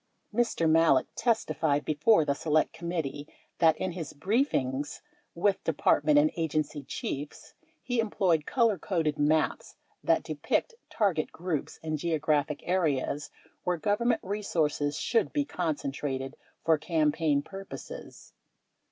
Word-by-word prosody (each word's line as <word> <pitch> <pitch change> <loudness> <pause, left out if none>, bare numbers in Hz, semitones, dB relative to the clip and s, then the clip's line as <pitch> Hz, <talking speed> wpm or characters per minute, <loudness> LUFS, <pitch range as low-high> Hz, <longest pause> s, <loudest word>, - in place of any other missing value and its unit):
Mr. 230 -8 +1
Malek 160 -4 +5
testified 165 -10 +1
before 155 +4 +4
the 140 - +2
Select 155 +2 +1
Committee 160 -4 -4 0.3
that, 160 -2 +5
in 185 - -2
his 165 -4 -6
briefings 145 - 0 0.3
with 195 +3 +1
department 300 -1 +3
and 300 +1 +5
agency 155 -2 -1
chiefs, 140 +1 -6 0.3
he 245 -2 -1
employed 185 -8 +1
colorcoded 185 - +1
maps 155 +2 +1 0.3
that - - +3
depicted 465 -1 -2
target 190 -8 0
groups 170 -4 -4
and 155 -1 -2
geographic 150 -2 0
areas 150 -5 0 0.3
where 180 -1 0
Government 215 +7 +1
re 205 +3 -3
sources 150 -5 0
should 225 +6 +1
be 290 -1 +1
concentrated 140 - -3 0.3
for 160 -2 +4
campaign 155 -2 +1
purposes. 195 +3 -9
160 Hz, 115 wpm, -29 LUFS, 150-195 Hz, 0.3 s, Malek